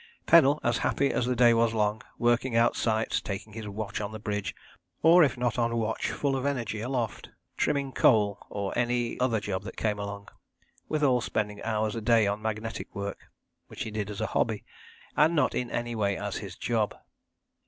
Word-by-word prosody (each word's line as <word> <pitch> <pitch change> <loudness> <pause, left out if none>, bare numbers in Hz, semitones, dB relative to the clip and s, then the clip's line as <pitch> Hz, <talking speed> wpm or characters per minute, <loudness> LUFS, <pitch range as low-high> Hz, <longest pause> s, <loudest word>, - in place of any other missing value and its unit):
Pennell, 150 -3 +6
as 120 0 +1
happy 140 0 +1
as 125 - 0
the 125 - +1
day 120 -1 +6
was 115 0 +2
long, 105 0 +1 0.2
working 120 +1 +1
out 115 +1 +4
sights, 110 -1 0
taking 100 +2 -6
his 110 -1 -6
watch 105 +1 -4
on 105 0 -4
the 110 - -6
bridge, 105 -2 -3 0.5
or 170 +2 +8
if 135 -4 +1
not 120 -1 0
on 115 0 +1
watch 110 -1 -1
full 140 -2 -1
of 130 - -2
energy 120 -6 -2
aloft, 120 -2 -3 0.3
trimming 140 -2 0
coal, 105 -6 +3
or 100 -1 -3
any 120 0 0
other 125 -3 +2
job 100 -2 -3
that - - -9
came 105 -2 -1
along; 100 0 -6 0.6
withal 140 -5 +2
spending 105 -2 -2
hours 110 -1 -1
a 115 - -3
day 115 0 +4
on 100 +1 -1
magnetic 110 +1 -4
work, 100 0 -5 0.4
which - - -6
he 110 - -6
did 105 -1 -3
as 105 0 -5
a - - +1
hobby, 110 -3 0 0.5
and 155 +3 +4
not 150 - +2
in 125 0 -2
any 120 0 -3
way 100 -3 0
as 100 -1 -3
his 95 -4 -7
job. 110 -1 -1
115 Hz, 195 wpm, -28 LUFS, 105-125 Hz, 0.6 s, or